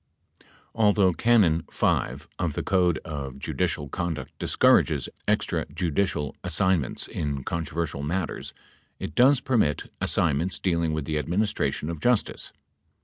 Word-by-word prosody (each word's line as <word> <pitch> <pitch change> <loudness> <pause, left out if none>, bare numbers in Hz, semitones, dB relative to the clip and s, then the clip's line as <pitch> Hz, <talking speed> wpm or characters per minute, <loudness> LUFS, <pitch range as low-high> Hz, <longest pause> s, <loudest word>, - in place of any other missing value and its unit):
8 - - -26 0.3
Although 105 -4 +3
Canon 95 -5 +4
5(g) - - 0
of - - -1
the - - -3
Code 90 -3 +2
of 70 -4 -5
Judicial 75 +1 -2
Conduct 85 +1 -4
discourages - - +3 0.2
extra - - 0
judicial 85 -4 -1
assignments 90 -4 0
in 70 -3 -3
controversial 80 -2 -3
matters, 85 +4 -3 0.5
it 75 - -6
does 130 - +5
permit 115 - 0
as - - 0
signments 85 +7 +1
dealing 85 -3 0
with 75 -2 -2
"the 75 -1 -1
administration 90 -2 -1
of 80 - -6
justice." 120 +2 0
85 Hz, 130 wpm, -26 LUFS, 75-95 Hz, 0.5 s, does